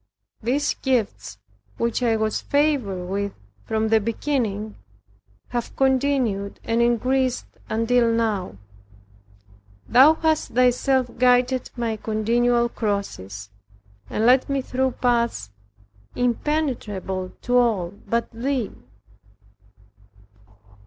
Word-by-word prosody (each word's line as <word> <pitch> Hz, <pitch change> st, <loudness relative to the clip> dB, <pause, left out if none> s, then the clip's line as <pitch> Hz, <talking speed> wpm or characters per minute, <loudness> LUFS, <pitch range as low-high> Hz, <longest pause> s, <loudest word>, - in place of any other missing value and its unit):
These 270 Hz, +6 st, 0 dB
gifts 240 Hz, -, -1 dB, 0.4 s
which 235 Hz, +1 st, -1 dB
I 235 Hz, -2 st, +2 dB
was 215 Hz, -1 st, -1 dB
favored 275 Hz, -11 st, 0 dB
with 200 Hz, +2 st, -2 dB, 0.3 s
from 220 Hz, 0 st, 0 dB
the 225 Hz, 0 st, +5 dB
beginning, 220 Hz, -2 st, -2 dB, 0.7 s
have 240 Hz, -1 st, -4 dB
continued 260 Hz, -7 st, +1 dB
and 230 Hz, +1 st, +1 dB
increased 250 Hz, +2 st, +1 dB, 0.2 s
until 230 Hz, +1 st, +2 dB
now 215 Hz, -, -1 dB, 1.3 s
Thou 270 Hz, +6 st, +7 dB
hast 315 Hz, -5 st, 0 dB
Thyself 250 Hz, 0 st, +2 dB
guided 250 Hz, 0 st, +3 dB
my 230 Hz, -2 st, -1 dB
continual 235 Hz, +3 st, +1 dB
crosses, 105 Hz, -, -4 dB, 0.6 s
and 220 Hz, -, 0 dB
led 255 Hz, +3 st, +4 dB
me 275 Hz, -1 st, 0 dB
through 260 Hz, 0 st, -1 dB
paths 235 Hz, -, 0 dB, 0.6 s
impenetrable 235 Hz, -8 st, -2 dB
to 245 Hz, 0 st, +3 dB
all 205 Hz, -8 st, +1 dB
but 230 Hz, +3 st, -2 dB
thee. 245 Hz, -1 st, -2 dB
235 Hz, 95 wpm, -23 LUFS, 215-255 Hz, 1.3 s, Thou